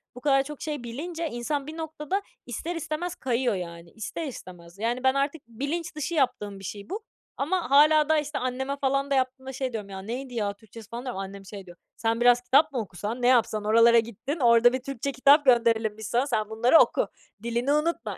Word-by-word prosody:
bu 250 - -10
kadar 270 -1 +3
çok 300 0 -9
şey 295 -5 -4
bilince, 325 +8 -4
insan 275 +4 -3
bir 315 - -7
noktada 315 +4 -3 0.2
ister 320 +9 -4
istemez 330 +2 -4
kayıyor, 245 -3 0
yani. 170 -1 -7
İster 225 +9 -5
istemez. 180 -6 -11
Yani, 240 +3 -1
ben 260 - +4
artık 280 +2 -1
bilinç 285 +9 -4
dışı 305 +2 -3
yaptığım 210 -8 0
bir - - -13
şey 200 - -7
bu 420 +3 -5 0.3
ama 335 +1 -1
hâlâ 300 +1 +6
daha, 315 -1 +4
işte, 295 0 -4
anneme 265 +2 -2
falan 275 +1 0
da 275 - +3
yaptığımda 260 0 -2
şey 260 -1 -3
diyorum: 210 -3 -5
"Ya, 190 - -7
neydi 250 +5 -6
ya 205 -3 -1
Türkçesi?" 220 +1 -14
falan 240 +3 -6
diyorum. 245 -6 -4
Annem 195 0 -7
şey 195 0 -9
diyor: 175 0 -14 0.2
"Sen 230 +1 0
biraz 245 0 +5
kitap 275 +5 +4
mı 255 - -2
okusan, 210 +4 -5
ne 245 - +3
yapsan? 220 -4 +3
Oralara 230 +2 +6
gittin, 235 - -4
orada 240 0 +5
bir 260 - 0
Türkçe 275 0 -3
kitap 280 +3 +5
gönderelim 230 -4 +3
biz 220 -1 -6
sana, 245 +5 +1
sen 215 -5 -1
bunları 240 +8 +5
oku! - - +3 0.4
Dilini 235 +4 0
unutma! 300 - -1
250 Hz, 210 wpm, -26 LUFS, 225-285 Hz, 0.4 s, hâlâ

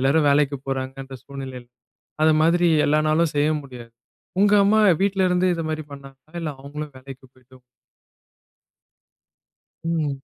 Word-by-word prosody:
எல்லாரும் 145 +3 +2
வேலைக்கு 140 0 +2
போறாங்கன்ற 135 0 -5
சூழ்நிலையில. 130 -3 -8 0.6
அது 155 0 +5
மாதிரி 170 +2 +3 0.2
எல்லா 150 +1 +3
நாளும் 160 +1 +1
செய்ய 145 +1 +2
முடியாது. 125 -4 -12 0.5
உங்க 205 0 +4
அம்மா 215 +2 +4 0.2
வீட்ல 195 -1 +1
இருந்து 180 +1 +2
இது 165 - -4
மாரி 155 -1 -4
பண்ணாங்களா? 135 +2 -14
இல்ல 160 - -3
அவங்களும் 145 +1 -7
வேலைக்கு 130 0 -12
போயிட்டு 130 0 -20 2.3
ம். 155 -5 -2
145 Hz, 130 wpm, -22 LUFS, 135-160 Hz, 2.3 s, அது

